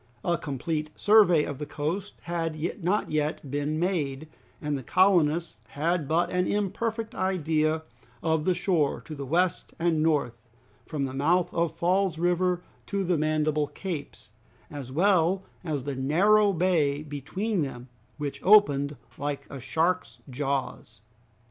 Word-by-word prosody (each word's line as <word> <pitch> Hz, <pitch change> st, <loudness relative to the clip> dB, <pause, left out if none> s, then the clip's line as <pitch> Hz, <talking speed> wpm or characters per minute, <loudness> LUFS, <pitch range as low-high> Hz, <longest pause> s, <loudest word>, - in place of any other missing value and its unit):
A 175 Hz, -, +2 dB
complete 155 Hz, +1 st, -3 dB
survey 205 Hz, -7 st, +5 dB
of 145 Hz, -2 st, -5 dB
the 150 Hz, -, -3 dB
coast 175 Hz, +7 st, -4 dB
had 165 Hz, -2 st, -3 dB, 0.3 s
not 190 Hz, +2 st, 0 dB
yet 150 Hz, -2 st, -1 dB
been 145 Hz, +2 st, -1 dB
made, 155 Hz, -5 st, -1 dB, 0.3 s
and 150 Hz, -1 st, -2 dB
the 135 Hz, -, -4 dB
colonists 170 Hz, -, +2 dB
had 155 Hz, +5 st, -1 dB
but 165 Hz, +3 st, +1 dB
an 180 Hz, 0 st, +1 dB
imperfect 220 Hz, +3 st, -2 dB
idea 160 Hz, -4 st, 0 dB, 0.4 s
of 160 Hz, -1 st, +1 dB
the 185 Hz, -, +2 dB
shore 170 Hz, -5 st, +1 dB
to 155 Hz, -, -9 dB
the 140 Hz, -2 st, -6 dB
west 175 Hz, +5 st, 0 dB
and 165 Hz, -2 st, +1 dB
north, 140 Hz, -7 st, +1 dB, 0.5 s
from 150 Hz, -3 st, -2 dB
the 130 Hz, -1 st, -3 dB
mouth 170 Hz, +6 st, +1 dB
of 170 Hz, -1 st, 0 dB
Falls 185 Hz, -1 st, +1 dB
River 180 Hz, +1 st, +1 dB, 0.2 s
to 200 Hz, -1 st, -1 dB
the 180 Hz, -1 st, +1 dB
Mandible 155 Hz, -1 st, +1 dB
Capes, 145 Hz, -, -7 dB, 0.4 s
as 140 Hz, -4 st, -7 dB
well 185 Hz, +3 st, +3 dB, 0.2 s
as 155 Hz, -5 st, -2 dB
of -, -, -13 dB
the 140 Hz, -1 st, -3 dB
narrow 200 Hz, +10 st, +4 dB
bay 160 Hz, -5 st, +1 dB
between 165 Hz, -, -2 dB
them, 125 Hz, -3 st, -5 dB, 0.3 s
which 145 Hz, -2 st, -4 dB
opened 145 Hz, -9 st, +5 dB, 0.2 s
like 145 Hz, 0 st, -3 dB
a 140 Hz, -, -6 dB
shark's 160 Hz, -2 st, -1 dB
jaws. 135 Hz, -4 st, -3 dB
160 Hz, 145 wpm, -27 LUFS, 145-180 Hz, 0.5 s, survey